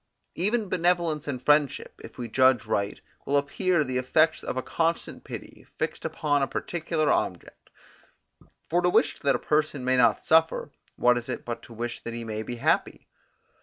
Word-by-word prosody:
Even 210 +4 0
benevolence 170 -4 0
and 135 -3 -3
friendship, 150 +1 +1
if - - -11
we 120 - -4
judge 130 0 +3
right, 100 -2 -1 0.2
will 145 - +1
appear 155 +4 +1
the 130 -2 -1
effects 155 +5 +2
of - - -4
a 130 - -1
constant 165 0 -2
pity, - - -10
fixed - - -3
upon 145 -2 0
a 135 - +1
particular 160 -2 -1
object: - - -3 1.0
for 175 +2 +2
to 180 - +3
wish 150 -4 +2
that 140 -1 +2
a - - +2
person 150 -3 0
may 130 0 +2
not 120 -3 +4
suffer, 160 -2 +2 0.2
what 125 0 +3
is 120 - -10
it 125 - -4
but 120 -1 -4
to - - -15
wish 120 +1 -5
that 115 - -5
he 120 - -5
may 110 -1 -4
be 120 +2 -5
happy? 120 - 0
140 Hz, 180 wpm, -26 LUFS, 120-160 Hz, 1.0 s, not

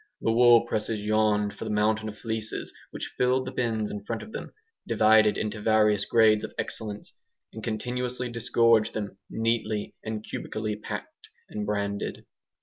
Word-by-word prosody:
The 115 - +1
wool 120 0 +7
presses 110 -2 -1
yawned 105 -1 +2
for - - -8
the 110 - -4
mountain 110 +1 +1
of 105 - -10
fleeces 110 -1 -4 0.2
which - - -6
filled 130 +1 +2
the 130 - -4
bins 115 -4 -1
in 105 -1 -6
front 115 +1 -4
of 220 - -11
them, - - -6 0.4
divided 110 -1 +5
into 105 0 -3
various 105 -2 +3
grades 110 -2 +4
of - - -6
excellence, 105 -2 -5 0.4
and 110 - -8
continuously 125 +2 -2
disgorged 115 -1 +3
them, 100 -2 -4
neatly 110 -2 -1
and 110 -1 -4
cubically 110 -1 -4
packed 105 - -8 0.2
and 105 -1 -4
branded. 100 -1 -2
110 Hz, 155 wpm, -27 LUFS, 105-115 Hz, 0.4 s, wool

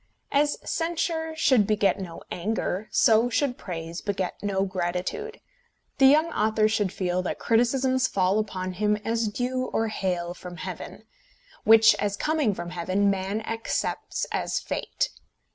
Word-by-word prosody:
As 295 +1 +2
censure 325 -1 -1
should 255 -9 +3
beget 210 -2 +2
no 175 -3 -7
anger, 205 +1 -2
so 225 +2 +4
should 250 +1 0
praise 170 -4 -6
beget 195 -3 -2
no 195 -1 0
gratitude. 185 - -3 0.6
The 270 - +8
young 310 +4 +4
author 215 0 +2
should 210 -3 0
feel 180 -1 -1
that 180 - -3
criticisms 255 +3 +2
fall 190 +2 +1
upon 185 -3 -3
him 210 +2 +1
as 225 0 0
dew 255 +4 -2
or 225 -3 -1
hail 175 -4 -2
from 180 0 -10
heaven, - - -7 0.6
which, 220 0 +8
as 205 -1 -1
coming 305 -9 +1
from 175 0 -6
heaven, 185 +3 +1
man 195 +2 -2
accepts 225 +1 -2
as - - -1
fate. - - -2
215 Hz, 145 wpm, -26 LUFS, 185-255 Hz, 0.6 s, The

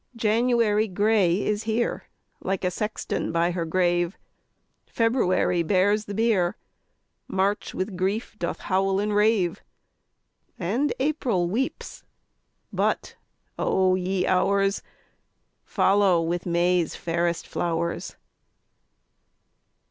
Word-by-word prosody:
4. - - -16
January 225 -1 +2
gray 205 -1 +2
is 210 +1 -1
here, 225 +2 -1 0.3
Like 195 0 -3
a 180 - +1
sexton 210 +4 -3
by 170 +1 +1
her 170 -1 -2
grave; 175 +1 +1 0.7
_20 - - -32
February 225 -7 +2
bears 200 +5 +2
the 200 - -6
bier, 210 -6 +1 0.7
March 195 +2 -1
with 190 +1 -3
grief 195 +5 -2
doth 170 - -3
howl 195 +1 +1
and 210 0 -1
rave, 210 -5 +2 1.0
And 235 +12 0
April 255 - 0
weeps 240 +9 -3 0.7
but, - - -1 0.4
O 185 -1 +2
ye 185 0 0
Hours! 195 +2 +2 0.8
Follow 195 -3 +3
with 170 +2 -2
May's 175 -1 +1
fairest 170 0 -1
flowers. 170 0 -3
190 Hz, 105 wpm, -25 LUFS, 175-215 Hz, 1.0 s, Follow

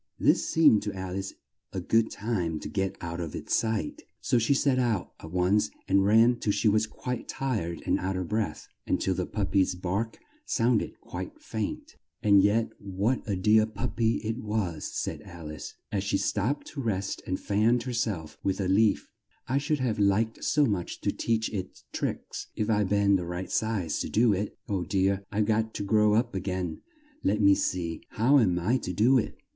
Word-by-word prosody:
This - - +3
seemed 150 -10 +5
to 105 0 -4
Al 95 -1 -5
ice 95 0 -3 0.4
a 95 - -3
good 110 +5 +2
time 90 -8 -2
to - - -5
get 95 +2 -2
out 85 0 -4
of 80 -3 -5
its - - -1
sight, 110 -9 -1 0.2
so 120 - +2
she 115 +5 +2
set 135 -2 +2
out 115 -7 0
at 80 - -10
once 90 +4 +2 0.2
and 95 0 +4
ran 115 +4 +5
till 105 - +1
she 110 - +1
was 110 +1 +3
quite 125 +2 -5
tired 105 - -3
and - - +2
out 95 +1 -2
of 90 -2 -3
breath, 110 +2 -2 0.2
and - - +1
till - - +1
the - - -2
pup - - -2
py's 95 -2 +3
bark 95 +5 -2 0.3
sound 115 - +2
ed - - -7
quite - - -7
faint. - - -5 0.3
"And 100 -2 +6
yet 105 +3 +2
what 100 +6 -1
a 100 - +1
dear 110 +3 +4
pup 105 -3 -4
py 115 -1 +3
it 110 +3 -2
was," 105 -8 -2
said - - -3
Al 85 -3 -9
ice, 75 - -8 0.2
as 100 -2 -1
she 100 0 +1
stopped 105 +8 -1
to 140 - -5
rest 100 -5 -2
and 95 - -1
fanned 110 +4 +2
her 125 - -4
self 105 -10 -2
with 95 0 -1
a 95 - 0
leaf: 105 +3 +3 0.4
"I 130 +3 +1
should 145 0 -1
have 115 -5 0
liked 105 +3 +1
so 150 0 +3
much 100 -8 -2
to - - +1
teach 110 -1 0
it 95 -2 -5
tricks, - - -4
if - - 0
if 105 - -3
I'd 105 -3 +2
been 100 -1 +4
the 90 - -4
right 90 +2 -5
size 105 -8 0
to - - -3
do 115 -1 +4
it! 100 +2 -3
Oh 95 -3 -1
dear! 95 +2 +1
I've 105 +1 +1
got 110 +1 0
to - - -2
grow 105 +1 +3
up 120 +1 +1
a 95 - -1
gain! 90 -3 -3 0.4
Let 105 - +2
me 100 -1 +6
see 85 -4 -1
how 130 +6 +4
am 90 -7 +3
I 105 +9 +2
to 90 - -4
do 125 +8 +4
it? - - -4
105 Hz, 210 wpm, -28 LUFS, 95-115 Hz, 0.4 s, And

